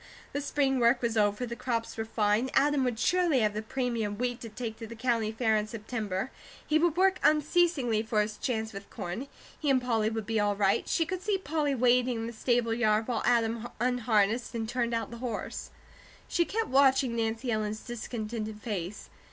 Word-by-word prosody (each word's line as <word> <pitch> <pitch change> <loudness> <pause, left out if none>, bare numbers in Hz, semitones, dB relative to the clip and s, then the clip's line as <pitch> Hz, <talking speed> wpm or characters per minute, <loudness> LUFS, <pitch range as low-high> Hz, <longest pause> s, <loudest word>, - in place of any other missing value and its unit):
The 285 - -1
spring 275 -2 +1
work 240 +1 +3
was 230 -1 0
over; 210 +2 +2
the 235 0 -5
crops 230 -2 -2
were 225 - -3
fine; 220 +3 +1
Adam 285 0 +3
would 245 -3 -1
surely 345 -2 +2
have 210 -1 +2
the 215 - -2
premium 225 -3 -2
wheat 245 0 -2
to 230 - -6
take 220 0 -5
to 225 - -6
the 230 - -9
County 230 -2 0
Fair 220 -1 +1
in 210 0 0
September; 215 -1 -4 0.3
he 310 0 +3
would 340 0 +2
work 375 0 +4
unceasingly 300 -7 +3
for 220 -1 0
his 210 0 -6
chance 220 -4 -2
with 195 0 -9
corn; 180 +11 -5 0.3
he 300 - -1
and 265 -1 +5
Polly 225 -4 +1
would 220 -1 -4
be 225 0 0
all 205 -1 +2
right; 195 -1 +2
she 330 - +2
could 365 +2 -4
see 410 0 +1
Polly 305 -5 -1
waiting 250 0 +3
in 225 0 -3
the 235 - -5
stable 235 0 +1
yard 220 -2 +2
while 245 -3 -1
Adam 230 -1 +2
unharnessed 235 -1 +1
and 225 -1 -2
turned 235 0 -1
out 230 - -3
the 235 - -7
horse. 235 -4 -4 0.6
Kate 340 -1 +1
kept 450 -4 -1
watching 265 -2 +4
Nancy 230 +2 -1
Ellen's 215 -1 -2
discontented 220 -2 -5
face. 205 -3 -5
235 Hz, 200 wpm, -29 LUFS, 220-260 Hz, 0.6 s, and